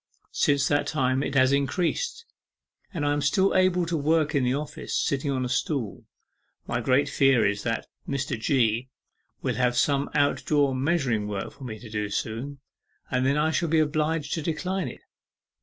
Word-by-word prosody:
Since 140 Hz, -1 st, +2 dB
that 145 Hz, 0 st, +1 dB
time 130 Hz, -3 st, +1 dB
it 140 Hz, -, -3 dB
has 130 Hz, 0 st, +5 dB
increased, 180 Hz, -, -1 dB, 0.7 s
but 165 Hz, -7 st, -3 dB
I 145 Hz, 0 st, +2 dB
am 145 Hz, -, -1 dB
still 190 Hz, +7 st, +2 dB
able 185 Hz, -2 st, +3 dB
to 165 Hz, 0 st, -2 dB
work 155 Hz, 0 st, +1 dB
in 140 Hz, -3 st, +2 dB
the 125 Hz, +1 st, +1 dB
office, 150 Hz, +1 st, -4 dB
sitting 140 Hz, +1 st, 0 dB
on 130 Hz, -2 st, 0 dB
the -, -, -1 dB
stool. 125 Hz, -2 st, -2 dB, 0.6 s
My 120 Hz, +1 st, -2 dB
great 130 Hz, +4 st, +2 dB
fear 135 Hz, -3 st, +3 dB
is 100 Hz, 0 st, 0 dB
that 115 Hz, 0 st, -2 dB, 0.2 s
Mr. 135 Hz, -2 st, -1 dB
G. 115 Hz, 0 st, +1 dB, 0.5 s
will -, -, 0 dB
have 125 Hz, -1 st, +1 dB
some 140 Hz, +2 st, +2 dB
out 145 Hz, -1 st, +2 dB
door 145 Hz, -3 st, +3 dB
measuring 130 Hz, -6 st, 0 dB
work 100 Hz, -2 st, -4 dB
for 135 Hz, -, -11 dB
me 110 Hz, -3 st, -6 dB
to 115 Hz, +2 st, -11 dB
do 105 Hz, -1 st, -3 dB
soon, 125 Hz, +7 st, -4 dB, 0.5 s
and 130 Hz, 0 st, +1 dB
that 140 Hz, +2 st, +2 dB
I 155 Hz, +1 st, +2 dB
shall 165 Hz, +1 st, 0 dB
be 160 Hz, -, +3 dB
obliged 155 Hz, 0 st, 0 dB
to 165 Hz, -, -2 dB
decline 180 Hz, +4 st, -2 dB
it. -, -, -9 dB
140 Hz, 185 wpm, -26 LUFS, 125-155 Hz, 0.7 s, has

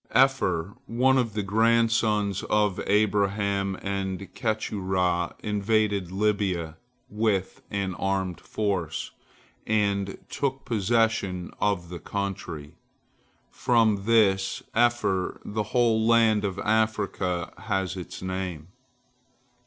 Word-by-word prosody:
Epher, 100 Hz, -10 st, +2 dB
one 130 Hz, +3 st, +3 dB
of 115 Hz, -4 st, -1 dB
the 105 Hz, -, 0 dB
grandsons 110 Hz, -1 st, +2 dB
of 105 Hz, -3 st, +2 dB
Abraham 100 Hz, -1 st, +1 dB
and 100 Hz, -1 st, -3 dB
Keturah, 95 Hz, -6 st, -1 dB
invaded 105 Hz, -3 st, +1 dB
Lybia 95 Hz, -5 st, 0 dB, 0.3 s
with 105 Hz, -3 st, -1 dB
an 100 Hz, -2 st, -2 dB
armed 95 Hz, -1 st, -2 dB
force, 95 Hz, -7 st, -2 dB, 0.6 s
and 100 Hz, -2 st, +1 dB
took 135 Hz, -1 st, -2 dB
possession 110 Hz, -4 st, 0 dB
of 100 Hz, -4 st, 0 dB
the 90 Hz, -1 st, -6 dB
country. 90 Hz, -6 st, -5 dB, 0.8 s
From 110 Hz, -5 st, +2 dB
this 100 Hz, -4 st, +3 dB
Epher 120 Hz, -6 st, +1 dB
the 110 Hz, +1 st, -2 dB
whole 115 Hz, -3 st, +3 dB
land 115 Hz, -3 st, +4 dB
of 95 Hz, -1 st, -3 dB
Africa 105 Hz, -5 st, 0 dB
has 95 Hz, -1 st, -1 dB
its 90 Hz, 0 st, -7 dB
name. 95 Hz, -3 st, -4 dB
100 Hz, 100 wpm, -26 LUFS, 95-110 Hz, 0.8 s, land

